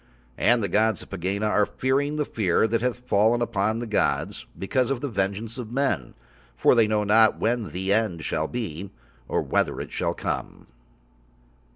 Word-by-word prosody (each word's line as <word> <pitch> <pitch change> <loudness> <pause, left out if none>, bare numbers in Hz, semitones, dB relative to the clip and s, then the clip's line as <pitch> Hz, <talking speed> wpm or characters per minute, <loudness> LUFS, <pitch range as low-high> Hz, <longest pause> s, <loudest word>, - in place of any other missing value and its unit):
And 120 -2 +3
the - - +1
gods 110 +2 +1
of - - -18
Pegāna 100 +3 -1
are 105 -1 +2
fearing 140 +3 0
the 150 -1 0
fear 105 -2 +1
that 115 0 0
hath 125 0 -2
fallen 110 +3 +3
upon 110 -2 0
the 120 - -4
gods 105 -2 -1
because 125 +6 0
of 135 -3 -1
the 145 - -3
vengeance 105 +2 -3
of 115 -2 -6
men, 120 - -1 0.4
for - - +4
They 115 -3 +4
know 105 -1 +1
not 110 +1 +4
when 115 -3 -1
The 95 +5 -1
End 100 -7 0
shall 80 0 -1
be, 100 -6 -5 0.4
or - - 0
whether - - 0
it - - -6
shall - - -1
come. - - -4
110 Hz, 180 wpm, -25 LUFS, 100-120 Hz, 0.4 s, for